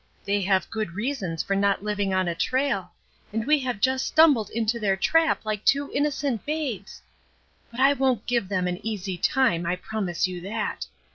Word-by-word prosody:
They 200 0 +1
have 190 0 +1
good 215 -6 -3
reasons 210 - -2
for 195 - -1
not 200 0 +1
living 205 -2 -1
on 185 -1 +1
a 170 - 0
trail, 255 +1 -1 0.4
and 220 +1 -2
we 300 0 +4
have 250 -5 -3
just 260 +3 0
stum 315 -1 +8
bled 220 -5 -3
into 230 +1 -1
their 195 -3 +1
trap 325 +6 +2
like 215 -1 -2
two 280 +1 +2
innocent 280 -5 -1
babes. 280 - -4 0.7
But 235 +2 -5
I 275 +1 +6
won't 260 -5 0
give 235 -6 0
them 185 -2 0
an 180 0 -4
easy 200 -4 -3
time, 230 -10 +2
I 175 - +1
promise 185 -2 -2
you 180 -1 -6
that. 210 +4 -3
215 Hz, 190 wpm, -25 LUFS, 190-265 Hz, 0.7 s, stum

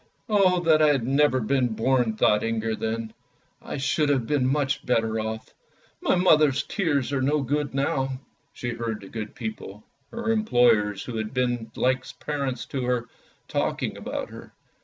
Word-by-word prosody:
" - - -40
"Oh, 190 -4 +4
that 160 -2 +4
I 155 - +6
had 140 -6 +2
never 135 0 +3
been 125 0 +1
born!" 125 -2 +1
thought 105 -1 +3
Inger 115 0 -1
then. 110 0 -3 0.2
" - - -41
I - - -6
should 145 +2 +1
have 135 -5 +1
been 140 -1 +1
much 140 0 0
better 110 -2 +1
off. 110 0 -5 0.5
My - - +2
mother's 155 -6 +4
tears 145 - -1
are 135 - 0
no 145 +2 +1
good 145 +1 -1
now." 135 -1 -1 0.3
She 120 - -4
heard 115 -2 -4
the 95 - -11
good 110 -2 -6
people, 110 -3 -7 0.3
her 235 -1 -2
employers, 120 - +3
who 120 -3 -5
had 110 +3 -4
been 120 -3 0
like 130 +1 +1 0.2
parents 140 -4 -3
to 135 -2 -1
her, 120 -2 -1 0.4
talking - - -1
about - - -5
her. - - -11
130 Hz, 175 wpm, -25 LUFS, 115-145 Hz, 0.5 s, I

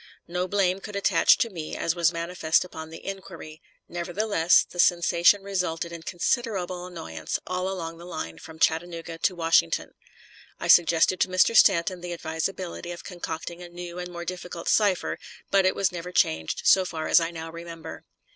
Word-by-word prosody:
No 180 +1 -2
blame 190 -1 +1
could 205 +1 -9
attach 200 - +4
to 230 - 0
me, 165 -4 -6
as 165 - 0
was 170 -1 +3
manifest 170 0 0
upon 160 -3 -9
the 165 - -11
inquiry; 180 -5 -8 0.3
nevertheless, 175 0 +2
the 175 - -11
sensation 175 +2 +4
resulted 180 -4 -2
in 170 -1 -7
considerable 180 -1 -2
annoyance 80 - -5
all 185 +1 -2
along 165 -3 -5
the 170 - -10
line 120 - -6
from 160 0 -12
Chattanooga 165 0 -1
to 185 - +1
Washington. 165 - +2 0.7
I - - -4
suggested 170 +1 +5
to - - +3
Mr. 185 +5 +3
Stanton 185 -3 +4
the 175 0 -5
advisability 170 +2 -4
of 175 - -8
concocting 170 -1 -6
a 175 - -9
new 175 0 -8
and 180 0 -5
more 175 0 -7
difficult 180 -1 -6
cipher, 200 -4 +2 0.3
but 195 -1 +4
it - - +1
was 195 - +1
never 175 0 -6
changed, 80 - 0
so 190 - +6
far 160 -3 -4
as - - +6
I 165 0 -1
now 165 -1 -7
remember. 170 0 -9
175 Hz, 175 wpm, -26 LUFS, 165-185 Hz, 0.7 s, so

